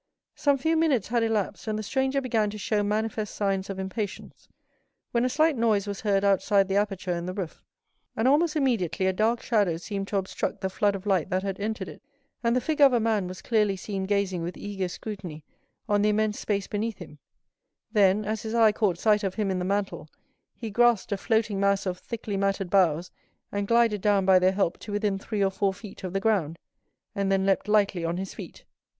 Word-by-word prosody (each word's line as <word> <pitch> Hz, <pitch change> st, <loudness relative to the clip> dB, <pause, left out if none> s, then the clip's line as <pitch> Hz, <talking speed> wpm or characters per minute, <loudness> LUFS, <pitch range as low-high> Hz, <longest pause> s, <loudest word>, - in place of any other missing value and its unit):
Some 285 Hz, -1 st, +2 dB
few 320 Hz, +5 st, +1 dB
minutes 295 Hz, -11 st, +2 dB
had 235 Hz, 0 st, +1 dB
elapsed, 225 Hz, -1 st, -1 dB
and 215 Hz, -1 st, -1 dB
the 215 Hz, -, -4 dB
stranger 265 Hz, +4 st, 0 dB
began 225 Hz, -5 st, +1 dB
to 210 Hz, -, -7 dB
show 210 Hz, 0 st, 0 dB
manifest 215 Hz, 0 st, -2 dB
signs 195 Hz, -1 st, -1 dB
of 195 Hz, -, -4 dB
impatience, 190 Hz, +1 st, -5 dB, 0.6 s
when 235 Hz, 0 st, +1 dB
a 255 Hz, -, +2 dB
slight 310 Hz, +3 st, +2 dB
noise 220 Hz, -4 st, +2 dB
was 200 Hz, -1 st, -5 dB
heard 200 Hz, -2 st, +1 dB
outside 200 Hz, 0 st, +3 dB
the 195 Hz, -, -1 dB
aperture 200 Hz, -3 st, 0 dB
in 170 Hz, 0 st, -4 dB
the 185 Hz, -, -4 dB
roof, 185 Hz, -5 st, -5 dB, 0.6 s
and 225 Hz, +3 st, +2 dB
almost 305 Hz, +4 st, +3 dB
immediately 230 Hz, -, 0 dB
a 190 Hz, -, +2 dB
dark 225 Hz, +4 st, +1 dB
shadow 205 Hz, -8 st, +1 dB
seemed 195 Hz, +3 st, -5 dB
to 200 Hz, -, -1 dB
obstruct 190 Hz, -1 st, -3 dB
the 190 Hz, -, -2 dB
flood 205 Hz, +1 st, +1 dB
of 195 Hz, +1 st, -7 dB
light 190 Hz, -4 st, +1 dB
that 185 Hz, 0 st, 0 dB
had 195 Hz, -1 st, -3 dB
entered 210 Hz, -2 st, -3 dB
it, -, -, -11 dB, 0.4 s
and 235 Hz, +1 st, +2 dB
the 250 Hz, -, +2 dB
figure 300 Hz, -1 st, +5 dB
of 265 Hz, -, -2 dB
a 240 Hz, -, +4 dB
man 215 Hz, -4 st, +1 dB
was 185 Hz, +1 st, -8 dB
clearly 210 Hz, -4 st, +2 dB
seen 195 Hz, 0 st, -4 dB
gazing 195 Hz, -3 st, 0 dB
with 170 Hz, +2 st, -5 dB
eager 195 Hz, -2 st, -3 dB
scrutiny 180 Hz, -5 st, -7 dB, 0.4 s
on 205 Hz, -1 st, +2 dB
the 210 Hz, -, +3 dB
immense 215 Hz, 0 st, 0 dB
space 200 Hz, -2 st, -1 dB
beneath 215 Hz, 0 st, -3 dB
him; 150 Hz, -4 st, -11 dB, 0.7 s
then, 205 Hz, -1 st, +3 dB
as 215 Hz, 0 st, -2 dB
his 220 Hz, +1 st, -4 dB
eye 225 Hz, -2 st, +6 dB
caught 205 Hz, -5 st, 0 dB
sight 210 Hz, +2 st, +2 dB
of 190 Hz, -2 st, -2 dB
him 210 Hz, -3 st, 0 dB
in 185 Hz, -, -1 dB
the -, -, -2 dB
mantle, 195 Hz, -4 st, -2 dB, 0.5 s
he 225 Hz, -3 st, -6 dB
grasped 240 Hz, -1 st, +3 dB
a -, -, +2 dB
floating 220 Hz, -1 st, 0 dB
mass 200 Hz, 0 st, +2 dB
of 180 Hz, -1 st, -3 dB
thickly 220 Hz, -3 st, -5 dB
matted 195 Hz, -2 st, -1 dB
boughs, 180 Hz, -3 st, +2 dB, 0.4 s
and 200 Hz, 0 st, -2 dB
glided 230 Hz, -3 st, +3 dB
down 200 Hz, -2 st, +2 dB
by 190 Hz, -1 st, +6 dB
their 185 Hz, +1 st, +3 dB
help 190 Hz, -4 st, 0 dB
to 210 Hz, -, -8 dB
within 205 Hz, -1 st, 0 dB
three 205 Hz, 0 st, -2 dB
or 195 Hz, -, +2 dB
four 195 Hz, +1 st, 0 dB
feet 205 Hz, -1 st, -11 dB
of 185 Hz, -, -4 dB
the 195 Hz, -, 0 dB
ground, 195 Hz, -7 st, 0 dB, 0.6 s
and 195 Hz, -1 st, -1 dB
then 195 Hz, 0 st, +2 dB
leaped 195 Hz, +2 st, +1 dB
lightly 205 Hz, -4 st, +2 dB
on 165 Hz, +1 st, -1 dB
his 190 Hz, +1 st, -5 dB
feet. -, -, -10 dB
205 Hz, 215 wpm, -26 LUFS, 190-220 Hz, 0.7 s, eye